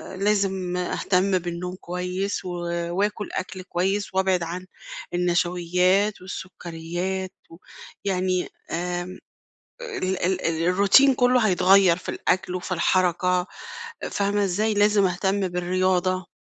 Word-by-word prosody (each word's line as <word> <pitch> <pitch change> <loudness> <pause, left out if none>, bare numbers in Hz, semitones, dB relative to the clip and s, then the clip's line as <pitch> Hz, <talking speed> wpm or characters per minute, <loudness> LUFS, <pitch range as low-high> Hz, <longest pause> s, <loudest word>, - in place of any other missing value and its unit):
لازم 190 -2 0
أهتم 185 +1 +1
بالنوم 175 +1 -5
كويس 180 +2 -3
و - - -4 0.5
وآكُل 205 0 -1
أكْل 185 0 -5
كويس، 190 +3 -1
وأبعِد 190 -2 +2
عن 175 +2 -5 0.5
النشويات 180 +3 +1
والسّكريات 185 0 -5 0.2
و - - -12 0.5
يعني 185 -1 0 0.2
آآ، 175 +1 -2 0.8
ال 190 - -2
ال 185 +1 +1
ال 165 0 0
الروتين 200 +9 +5
كلّه 250 0 +3
هيتغير 185 -1 +5
في 185 - -12
الأكل 185 -1 -1
وفي 185 +1 -4
الحركة، 180 +1 +2 0.6
فاهمة 205 0 +1
إزاي، 210 +4 0
لازم 205 -1 +4
أهتم 190 +2 0
بالرياضة. 185 0 0
185 Hz, 110 wpm, -24 LUFS, 180-195 Hz, 0.8 s, الروتين